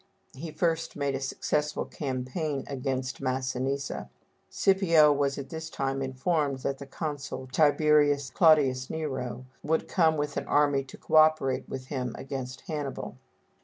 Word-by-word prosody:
He 160 +5 -7
first 165 +1 -1
made 140 -1 -1
a 135 - -2
successful 150 +2 -1
campaign 135 +2 -3
against 130 -1 -3
Massinissa. 130 - -2 0.4
Scipio 170 -6 +4
was 140 -1 0
at 140 -1 -6
this 160 0 -6
time 135 -2 -2
informed 135 +1 -1
that 135 +1 -2
the 140 - -8
consul 145 -2 -5
Tib. 145 +2 +4 0.6
Claudius 145 -7 +4
Nero 130 -5 -4 0.2
would 160 +1 0
come 160 -3 +3
with 145 0 -2
an - - -3
army 145 -2 +3
to - - -12
co 155 - +1
operate 155 -4 +4
with 130 -1 -5
him 125 -3 -3
against 130 -1 -6
Hannibal. 150 -5 -5
140 Hz, 140 wpm, -28 LUFS, 130-155 Hz, 0.6 s, Scipio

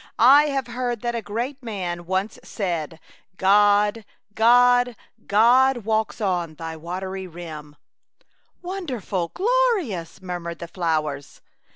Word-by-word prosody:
" - - -37 0.2
I - - 0
have 275 -3 -1
heard 240 -2 -3
that 240 -1 -2
a 235 - -2
great 235 +7 -4
man 180 -7 -5
once 190 +3 -2
said, 165 -5 -4 0.2
* 185 - -40
God, 205 +2 +4 0.3
God, 245 +2 +4 0.3
God 240 +3 +4
walks 220 -1 -1
on 175 -6 -1
thy 165 +1 -6
wa 170 +3 -5
tery 190 -1 -6
rim/ 155 -3 -9 0.3
" - - -41
" - - -44
Wonderful, 255 - -3
glorious," 385 - 0
murmured 175 -2 -6
the 170 - -7
flowers. 155 -5 -3
205 Hz, 140 wpm, -23 LUFS, 175-245 Hz, 0.3 s, God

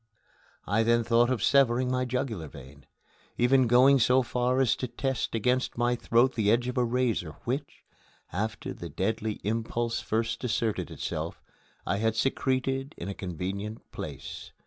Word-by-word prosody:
I 105 +4 +2
then 115 +1 +3
thought 120 +1 +3
of 130 -5 0
severing 130 -2 +3
my 130 0 0
jugular 120 - -3
vein, 70 0 -13 0.5
even 125 +1 +4
going 130 +3 +6
so 125 +2 +4
far 125 +1 0
as 130 -5 +3
to 125 - -3
test 130 0 -2
against 125 +3 0
my 120 +1 +2
throat 120 +2 +2
the 105 -3 +1
edge 120 +3 +3
of 125 - -3
a 125 - +2
razor 115 -9 0
which, 140 +4 -4 0.5
after 110 +5 -3
the 85 - -8
deadly 110 +7 -1
impulse 115 +2 -1
first 110 +3 -2
asserted 115 -3 -1
itself, - - -4 0.5
I 100 - 0
had 110 +1 +1
secreted 135 +3 0
in 90 - -5
a - - -3
convenient 95 +4 -5
place. - - -7
120 Hz, 155 wpm, -28 LUFS, 110-125 Hz, 0.5 s, going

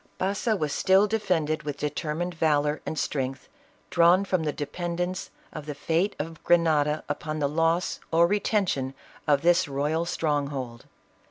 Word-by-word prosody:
Baza 200 +4 0
was 155 -7 -2
still 190 +2 +4
defended 175 -8 0
with 145 -1 -5
determined 150 +4 -2
valor 150 -2 +1
and 155 - -3
strength, 135 -2 -2 0.4
drawn 175 +3 +5
from 185 -3 0
the 155 -2 -1
dependence 175 +5 -3 0.2
of 155 -1 -7
the 150 - -4
fate 170 +7 0
of 160 +1 -6
Grenada 155 -3 +3
upon 155 +1 -3
the 145 -2 +1
loss 165 +4 +1
or 165 +1 +5
retention 185 -9 0 0.3
of 145 -1 +3
this 175 0 +4
royal 145 +4 -1
strong 150 -4 0
hold. 130 -4 -6
160 Hz, 150 wpm, -26 LUFS, 145-175 Hz, 0.4 s, drawn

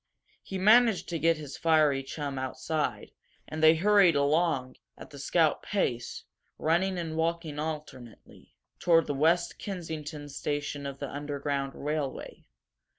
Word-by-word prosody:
He 190 - -6
managed 220 +1 +5
to 170 -2 -2
get 165 +1 +3
his 150 -3 -8
fiery 155 -4 +3
chum 140 0 -5
outside, 150 +4 -3 0.4
and 155 - -5
they 160 +1 +7
hurried 195 -1 +5
along, 145 -2 +1 0.2
at - - -12
the 140 - -10
scout 160 +2 +2
pace, 125 - -2 0.3
running 180 +4 +1
and 165 -2 -4
walking 165 -2 -2
alternately, 150 -7 -8 0.2
toward 165 -2 +4
the 145 - -2
West 165 +5 +1
Kensington 160 -6 -6
station 145 0 -3
of 140 -1 -6
the 140 - -5
Underground 140 -1 -3
Railway. 150 -2 -4
155 Hz, 135 wpm, -29 LUFS, 140-170 Hz, 0.4 s, they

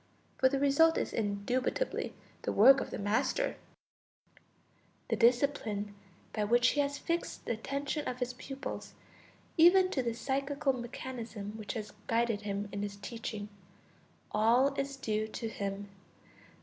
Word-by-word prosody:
For 260 - +5
the 275 - 0
result 285 +4 +5
is - - -2
indubitably 225 - -1 0.3
the - - -1
work 265 +6 +7
of - - -4
the - - -4
master; 205 +1 0 1.5
the - - +4
discipline 230 -4 +2 0.4
by 215 - 0
which 240 +3 +4
he 290 - 0
has 285 0 +1
fixed 335 +1 -3
the - - -1
attention 280 +6 -2
of 250 - -3
his 250 0 -2
pupils, 270 +2 -7 0.6
even 370 +3 +7
to 265 - +1
the 235 -2 -1
psychical 275 +2 0
mechanism 235 -4 -6
which 215 -2 -5
has 215 -2 -5
guided 230 -2 +1
him 205 0 -3
in 200 - -3
his 205 -1 -3
teaching, 210 0 -6 0.8
all 235 +6 +4
is 275 0 -2
due 215 -5 -1
to 225 +1 -5
him. 200 -1 -4
240 Hz, 140 wpm, -32 LUFS, 210-275 Hz, 1.5 s, work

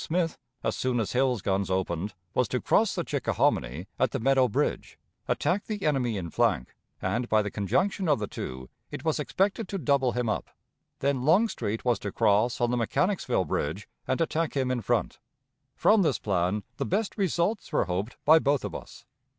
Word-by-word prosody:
Smith, 165 -1 0 0.3
as - - 0
soon 125 -2 0
as 110 - -1
Hill's 125 -4 +1
guns 95 0 0
opened, 95 +1 -2 0.2
was - - +2
to - - -1
cross - - +2
the - - -1
Chickahominy 65 +9 0
at 130 - +3
the 135 - -3
Meadow 130 +1 +4
Bridge, 105 - -2 0.3
attack 195 +3 0
the 210 -2 -3
enemy 125 -7 +1
in 85 -4 -5
flank, 105 - +1 0.3
and 120 +1 -1
by 110 -1 +4
the 105 - -4
conjunction 180 - 0
of 150 - +4
the 105 - -2
two 65 -9 -6 0.2
it - - -7
was - - +1
expected 200 +2 0
to 195 - -3
double 140 -7 +2
him 125 -1 -1
up. 110 - -2 0.5
Then 140 -2 +1
Longstreet 140 - +1
was 120 -2 +2
to 105 - -4
cross 110 +3 +2
on 120 0 +1
the 125 - +1
Mechanicsville 125 - +1
Bridge 80 +6 -2 0.2
and 130 - 0
attack 165 -2 0
him 130 -1 +1
in 125 -2 -1
front. 120 +3 -1 0.6
From 215 0 +4
this 170 - +2
plan 95 +1 0
the - - -1
best 205 +3 -1
results 195 +1 0
were - - +2
hoped 95 +6 -3
by 160 +1 +8
both 140 -2 +1
of - - -5
us. - - -9
125 Hz, 190 wpm, -27 LUFS, 105-160 Hz, 0.6 s, by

